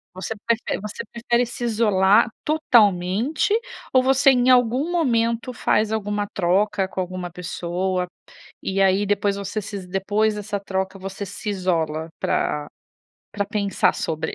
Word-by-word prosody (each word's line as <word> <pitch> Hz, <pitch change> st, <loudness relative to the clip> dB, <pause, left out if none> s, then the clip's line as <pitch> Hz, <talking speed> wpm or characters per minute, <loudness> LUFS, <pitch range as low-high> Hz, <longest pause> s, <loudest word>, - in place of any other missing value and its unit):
Você 190 Hz, +4 st, -4 dB
prefere 230 Hz, 0 st, 0 dB
você 210 Hz, +1 st, -6 dB
prefere 235 Hz, +1 st, 0 dB
se 240 Hz, +1 st, -6 dB
isolar 210 Hz, -2 st, +4 dB, 0.2 s
totalmente, 235 Hz, -, +2 dB, 0.4 s
ou 255 Hz, -, +6 dB
você 265 Hz, +1 st, +5 dB
em 250 Hz, -1 st, +3 dB
algum 250 Hz, +5 st, +3 dB
momento 235 Hz, -6 st, +1 dB
faz 215 Hz, -2 st, +1 dB
alguma 205 Hz, -1 st, -1 dB
troca 190 Hz, +1 st, +1 dB
com 190 Hz, -, -5 dB
alguma 180 Hz, -1 st, -4 dB
pessoa? 180 Hz, +1 st, -2 dB, 0.6 s
E 195 Hz, 0 st, -1 dB
aí, 195 Hz, +1 st, +3 dB
depois 200 Hz, 0 st, +1 dB
você 200 Hz, +2 st, -4 dB
se 205 Hz, -, -7 dB
is 185 Hz, -2 st, -9 dB
depois 205 Hz, +3 st, 0 dB
dessa 205 Hz, 0 st, -4 dB
troca, 190 Hz, 0 st, -3 dB
você 195 Hz, +1 st, -6 dB
se 200 Hz, +3 st, -6 dB
isola 165 Hz, -5 st, -1 dB
pra 150 Hz, 0 st, -1 dB, 0.7 s
pra 200 Hz, 0 st, -1 dB
pensar 200 Hz, -1 st, +1 dB
sobre. 160 Hz, -1 st, -3 dB
205 Hz, 140 wpm, -22 LUFS, 185-230 Hz, 0.7 s, ou